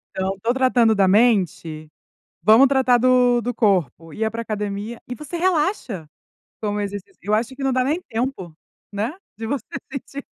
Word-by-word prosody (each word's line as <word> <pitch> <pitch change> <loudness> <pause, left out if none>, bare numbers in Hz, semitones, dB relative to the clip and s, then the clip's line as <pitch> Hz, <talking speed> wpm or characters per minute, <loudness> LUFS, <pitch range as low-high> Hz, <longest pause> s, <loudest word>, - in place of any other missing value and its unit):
Então 190 +1 -2
tô 235 +2 +2
tratando 255 -4 +3
da 195 -3 +3
mente, 185 -8 +2 0.5
vamos 220 +8 +7
tratar 260 -2 +3
do 250 0 +4
do 245 +2 -3
corpo, 175 - 0
ia 220 +4 -1
para 230 +1 -5
academia 210 +1 -4
e 245 - -4
você 300 +4 -7
relaxa, 310 - 0 0.5
com 205 -1 -1
o - - -1
exercício. 200 -1 -6
Eu 210 +3 0
acho 235 +4 -1
que 280 - -7
não 270 - +2
dá 255 0 +2
nem 300 +7 0
tempo, 225 - -4 0.4
né? 210 +6 -2 0.2
De 225 - -5
você 260 -2 -2 0.3
sentir. 275 0 -7
225 Hz, 175 wpm, -22 LUFS, 200-255 Hz, 0.5 s, vamos